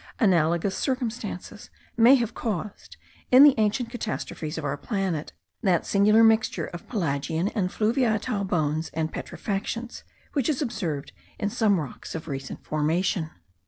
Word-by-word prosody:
Analogous 175 -2 +2
circumstances 240 -7 -4 0.3
may 235 +3 +7
have 235 -4 -1
caused, 200 - -5 0.3
in 255 +2 +9
the 290 -2 +9
ancient 225 +3 +1
catastrophes 195 -9 -4
of 160 - -4
our 140 0 -1
planet, 190 - -2 0.3
that 185 -7 +2
singular 210 +3 +5
mixture 220 -7 +3
of 175 - -9
pelagian 160 - -1
and 195 -6 -1
fluviatile 220 -1 0
bones 155 -2 0
and 160 0 -1
petrifactions, 225 +4 -4 0.3
which 275 -3 +1
is 290 - 0
observed 190 - -3 0.3
in 205 - -2
some 205 -5 +2
rocks 150 +1 -7
of 160 0 -6
recent 135 -3 -6
formation. 160 +2 0
200 Hz, 135 wpm, -26 LUFS, 160-225 Hz, 0.3 s, in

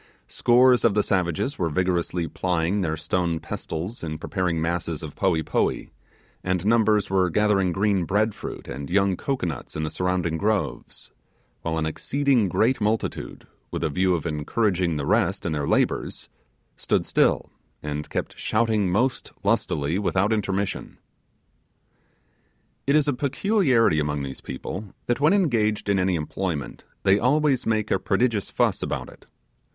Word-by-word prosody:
Scores 125 - +4
of 115 -4 +3
the 105 - +3
savages 95 - -1
were 85 - +1
vigorously 90 0 0
plying 90 +3 0
their 80 -3 -1
stone 85 +1 -1
pestles 90 +10 -5
in 80 -1 -4
preparing 90 0 -1
masses 85 -1 -2
of 75 -2 -7
poee 85 -4 +1
poee, - - -1 0.5
and 90 0 -1
numbers 110 -2 +3
were 95 -2 +3
gathering 100 -1 +2
green 95 -1 +1
bread 105 +4 +1
fruit - - -8
and 70 0 -6
young 100 +1 +2
cocoanuts 90 - -3
in 80 - -2
the 75 - -3
surrounding 90 -3 -1
groves; 105 0 -2 0.5
when 80 -1 -2
an 80 -1 0
exceeding 130 - +1
great 115 +7 +2
multitude, 105 +1 -2 0.2
with - - -4
a 80 - 0
view 90 +3 +2
of 85 - -4
encouraging 85 +2 0
the 70 - -2
rest 95 +6 +1
in 85 - -1
their 75 -2 -1
labours, - - 0 0.5
stood - - 0
still, - - +2 0.3
and 75 0 -4
kept - - -3
shouting 110 -3 +1
most 120 +7 0
lustily 75 +6 0
without 100 +1 +1
intermission. 100 -2 -2 1.9
It 140 - +4
is 155 -1 +3
a 145 - +2
peculiarity 135 - +2
among 75 -1 -1
these 65 -1 -6
people, 95 +9 -7
that, 120 - 0
when 150 +6 +4
engaged 115 - +1
in 100 -1 +3
an 95 +1 +2
employment, 85 -2 -3 0.2
they 100 +1 +4
always 140 +1 +2
make 110 -1 0
a - - +2
prodigious 115 -5 0
fuss - - +1
about - - -3
it. - - -16
95 Hz, 150 wpm, -24 LUFS, 80-110 Hz, 1.9 s, Scores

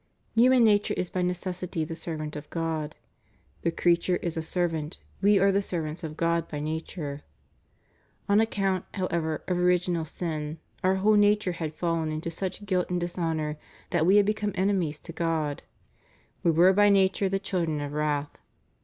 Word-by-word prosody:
* - - -41
Human 250 +1 +6
nature 210 -2 +3
is 180 - -2
by 185 - -1
necessity 180 -1 -2
the 160 +1 -5
servant 155 -3 -5
of 150 0 -8
God: 160 -2 -3 0.7
"The 170 - +1
creature 175 +2 +2
is 170 -2 -3
a 160 - -1
servant, 165 -1 -2 0.2
we 205 +1 +5
are 195 +1 +4
the 200 +1 +2
servants 165 -3 -3
of 155 -1 -6
God 170 -1 +1
by 150 - -5
nature." 155 -1 -4 0.5
' - - -39
On 200 +1 +4
account, 195 -4 0
however, 170 -5 -1
of 180 -1 0
original 180 -2 +2
sin, 155 -1 -4 0.3
our 185 +1 +3
whole 205 +3 +3
nature 205 -2 +4
had 160 -3 -5
fallen 165 -2 -1
into 155 +2 -3
such 190 +4 -4
guilt 185 -3 0
and 180 0 0
dishonor 165 -3 -2 0.3
that 160 - +2
we 190 - +6
had 205 -1 +6
become 210 -1 -1
enemies 185 -6 0
to 165 - -9
God. 160 -4 -1 0.8
We - - +2
were 175 +4 +5
by 205 +1 +5
nature 195 0 +3
the 195 - +1
children 175 -6 -1
of 145 0 -4
wrath.'' 150 -1 -1
175 Hz, 175 wpm, -27 LUFS, 160-190 Hz, 0.8 s, Human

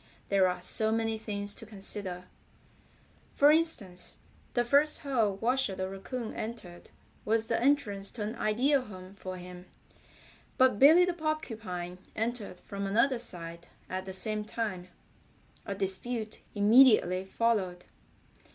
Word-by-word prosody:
There 195 -2 +4
are 180 0 -3
so 220 +4 +4
many 225 0 0
things 205 -2 -3
to - - -9
consider. 195 -3 -7 1.1
For 290 +1 +6
instance, 250 - 0 0.4
the 240 -1 +2
first 285 +5 +4
hole 230 -9 +1
Washer 235 0 +1
the 185 0 -3
Raccoon 220 +5 -6
entered 215 -6 -7 0.3
was 220 +1 +1
the - - -1
entrance 230 -8 +1
to 220 - -4
an 215 +3 -4
ideal 255 +7 +2
home 185 -5 -11
for 185 -2 -7
him, 180 0 -10 0.9
but 260 -5 +4
Billy 325 +6 +8
the 360 - -1
Porcupine 220 - -4 0.2
entered 225 -5 -3
from 200 0 -5
another 235 +5 +2
side 170 -6 -7 0.2
at 185 0 -3
the - - -4
same 210 +3 -2
time. 210 -5 -4 0.8
A 200 - -3
dispute 215 +3 -2 0.2
immediately 210 -4 +5
followed. 190 -4 -1
210 Hz, 135 wpm, -30 LUFS, 185-240 Hz, 1.1 s, Billy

